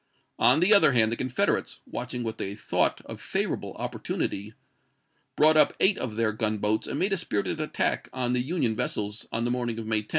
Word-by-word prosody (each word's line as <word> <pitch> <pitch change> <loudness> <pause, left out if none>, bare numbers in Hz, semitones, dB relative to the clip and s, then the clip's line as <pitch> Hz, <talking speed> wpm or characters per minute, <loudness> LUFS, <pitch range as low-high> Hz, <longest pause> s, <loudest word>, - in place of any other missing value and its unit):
On 160 - +4
the 190 +5 +6
other 155 -9 +7
hand, 110 -2 +3
the - - 0
Confederates, 130 0 -1
watching 125 0 -5
what 110 -1 -5
they 100 +1 -4
thought 105 - 0
a - - -7
favorable - - -3
opportunity, 105 +3 -4 0.8
brought 155 +1 +5
up 155 - +6
eight 190 +1 +3
of 110 -4 -4
their 115 -1 +1
gunboats, 110 0 -1
and - - -3
made 195 +5 +1
a - - +1
spirited 155 - -2
attack 155 - -2
on 125 -1 -1
the 125 - +1
Union 130 -5 -1
vessels 105 -1 -3
on 115 +1 -2
the 120 - 0
morning 120 -2 -2
of 115 - -5
May 110 -1 +1
10. 105 - -18
120 Hz, 200 wpm, -26 LUFS, 110-145 Hz, 0.8 s, other